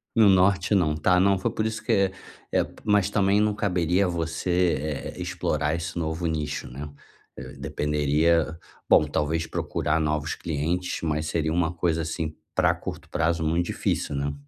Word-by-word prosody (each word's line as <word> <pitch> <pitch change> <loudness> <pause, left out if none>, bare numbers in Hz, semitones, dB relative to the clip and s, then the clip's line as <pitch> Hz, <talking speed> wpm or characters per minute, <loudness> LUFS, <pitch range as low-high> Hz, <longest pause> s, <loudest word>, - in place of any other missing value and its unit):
No 110 -3 +6
norte 95 +1 +3
não. 80 -5 +2
Tá. 90 +4 +3
Não 100 +1 +4
foi - - -1
por 110 - -2
isso 110 0 -3
que - - -1
é 100 -1 +3 0.4
é - - +3 0.2
Mas 105 -3 +3
também 100 0 +3
não 105 -1 +2
caberia 90 -1 +1
a - - 0
você, 85 +1 0 0.4
eh, - - -7
explorar 75 0 -1
esse 85 +1 -4
novo 80 +1 -2
nicho, 75 -2 -3
né. 70 +4 -7 0.5
Eh, - - -8
dependeria 75 +3 +1 0.3
bom, 75 - +6
talvez 75 +2 -1
procurar 80 +1 -1
novos 75 +1 -1
clientes, 85 +4 -2
mas 75 -1 -1
seria 80 0 0
uma 85 -1 +1
coisa, 85 -1 0
assim, 80 -1 -3 0.2
pra - - +3
curto - - -8
prazo, 80 0 0
muito 85 +2 +1
difícil, 75 - -1
né? 70 +1 -1
80 Hz, 170 wpm, -25 LUFS, 75-90 Hz, 0.5 s, No